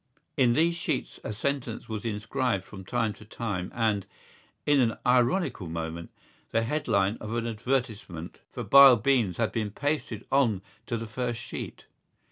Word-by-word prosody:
In 125 -3 +4
these 165 +5 +3
sheets 160 -4 -3
a - - -3
sentence 120 +1 -3
was 110 0 -5
inscribed 110 -1 -1
from 95 0 -10
time 115 +1 0
to - - -14
time 100 -4 -4
and, 110 -4 +1 0.6
in 145 -1 +4
an 115 -3 +2
ironical 125 - +2
moment, 80 0 -5 0.4
the 115 - +1
headline 110 -6 +1
of 110 +2 -5
an 115 0 -1
advertisement 110 -7 -3
for 120 - -5
Bile 135 +3 +9
Beans 115 -5 +2
had 115 -2 +1
been 110 -3 -1
pasted 125 -2 -2
on 120 -9 +3 0.2
to 115 - -1
the 115 - -5
first 120 +1 -3
sheet. - - -7
115 Hz, 155 wpm, -28 LUFS, 105-130 Hz, 0.6 s, Bile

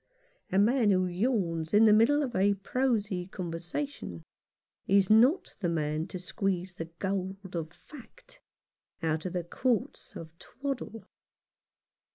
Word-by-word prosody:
A 190 - +1
man 225 +2 +4
who 185 -2 +3
yawns 180 -4 -1
in 220 +2 +7
the 215 - +7
middle 285 +8 +4
of 245 -3 -4
a 200 +2 +3
prosy 205 -4 -1
conversation 175 - -5 0.6
is 195 0 +4
not 255 - +4
the 180 -5 0
man 155 -1 -1
to - - -6
squeeze 185 0 -2
the 165 - -5
gold 190 -1 -4
of 160 -2 -3
fact - - -15 0.6
out 160 +1 0
of 180 - -6
the 180 -1 -1
quartz 235 +5 -2
of 160 0 -9
twaddle. 240 -4 -6
195 Hz, 135 wpm, -29 LUFS, 175-230 Hz, 0.6 s, in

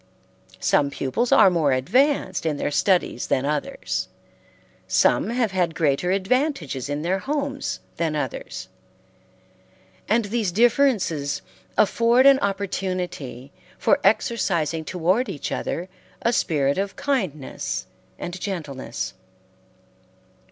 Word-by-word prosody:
Some 140 - +2
pupils 140 - -1
are 190 - +7
more 155 -6 +2
advanced 220 - +2
in 155 -3 -1
their 145 - -1
studies 180 -5 +1
than 130 - +1
others: 150 - -2 0.8
some - - +3
have 235 -3 0
had 175 -3 0
greater 155 +2 +1
advantages 190 - 0
in 145 +1 -2
their 185 +3 0
homes 280 +2 -3 0.2
than 160 -2 0
others: - - -4 1.4
and 225 0 +3
these 210 -2 -1
differences 210 - +2 0.3
afford 235 +5 +4
an 275 -1 +7
opportunity 185 -9 -3 0.3
for - - +3
exercising 170 -7 +1
toward 185 +8 +1
each 150 -7 -4
other 175 +2 -3 0.4
a 235 - +2
spirit 145 -7 +1
of 195 0 -2
kindness 190 - -2 0.3
and 175 +1 -6
gentleness. 155 -10 -4
185 Hz, 110 wpm, -23 LUFS, 150-235 Hz, 1.4 s, are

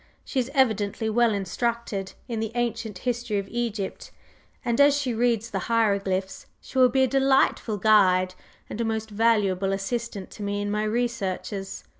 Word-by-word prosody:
She 265 - -1
is 250 0 -1
evidently 220 -4 +1
well 235 +1 +3
instructed 205 -1 -2
in 230 -3 -3
the 220 0 -2
ancient 230 -4 -2
history 240 0 -2
of 200 -1 -3
Egypt, 225 -5 -3 0.6
and, 235 +3 +2
as 285 0 +6
she 265 -4 -1
reads 230 -1 0
the - - -1
hieroglyphs, 200 -4 0
she 265 - -4
will 255 -1 +7
be 265 +2 +3
a - - +4
delightful 270 -4 +2
guide 185 -3 +4 0.3
and 230 - -5
a - - +1
most 220 -1 -2
valuable 200 -3 +2
assistant 200 0 -3
to - - -10
me 205 0 -2
in 205 0 -2
my 210 +1 0
researches." 210 -4 -3
220 Hz, 165 wpm, -25 LUFS, 200-240 Hz, 0.6 s, will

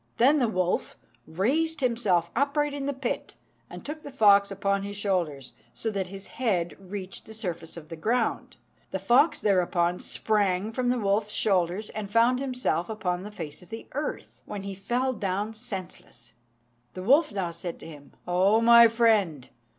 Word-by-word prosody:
Then 280 +6 +5
the 245 - +2
wolf 185 -4 -1 0.3
raised 290 - 0
himself 210 -9 +1
upright 285 +2 +1
in 280 -1 -4
the - - +1
pit, 265 -3 -4 0.3
and - - -10
took 305 +2 -6
the 285 - -9
fox 205 -6 +5
upon 200 0 0
his 200 0 -5
shoulders, 170 -10 -2 0.2
so 225 - -2
that 195 -3 -2
his 195 +1 -9
head 180 -10 -1
reached 190 0 -8
the 220 - -10
surface 170 -6 -5
of 155 -1 -10
the 165 - -6
ground. 225 +8 -1 0.3
The - - -2
fox 255 - +3
thereupon 180 -3 +1
sprang 205 -1 0
from 245 +1 -1
the 250 - +2
wolf's 210 -1 0
shoulders, 190 +1 +1
and 210 -2 -5
found 230 +4 +3
himself 255 -9 -1
upon 185 -5 -2
the 205 - -7
face 160 -8 -7
of 180 - -17
the 225 - -7
earth, 295 +3 -5
when 205 -2 -5
he 200 0 -5
fell 245 +7 -1
down 205 0 -2
senseless. 185 - -9 0.6
The 185 - -6
wolf 280 - +4
now 190 -4 -2
said 170 +1 -6
to - - -10
him, 145 -3 -13
"O 190 +5 +3
my 235 0 +8
friend! 210 - +2
205 Hz, 175 wpm, -27 LUFS, 180-240 Hz, 0.6 s, my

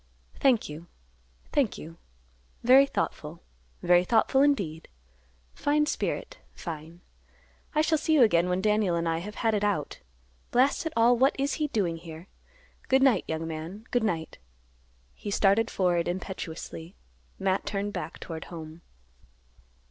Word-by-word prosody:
"Thank 255 -5 +3
you; 155 +3 -9 0.6
thank 270 -7 +1
you; 165 +2 -10 0.7
very 265 +3 +7
thoughtful; 160 - -4 0.4
very 175 0 +5
thoughtful, 235 +6 +3
indeed; 195 - +1 0.7
fine 300 +1 +1
spirit, - - -3 0.2
fine. 165 +1 -8 0.7
I 305 - +4
shall 315 -1 +2
see 315 +1 +2
you 275 - +7
again 175 -5 +3
when 180 +1 0
Daniel 210 -4 +2
and 170 0 -1
I 165 0 0
have 210 +5 -8
had 225 - +3
it 205 -1 0
out. 200 -8 -1 0.5
Blast 270 +6 +2
it 320 - -6
all; 235 +2 +5
what 265 +3 +3
is 275 +2 0
he 300 - +2
doing 190 - -1
here? 165 +1 -10 0.6
Good 265 0 +4
night, 265 -4 +4
young 160 0 -3
man; 165 +7 -7
good 245 - +2
night." 165 -7 -2 0.7
He 205 - -7
started 200 +3 +3
forward 175 -3 +1
impetuously. 175 -1 -6 0.4
Matt 190 0 -1
turned 205 0 -2
back 180 - -5
toward 160 -2 -7
home. 160 -1 -9
195 Hz, 145 wpm, -27 LUFS, 165-245 Hz, 0.7 s, very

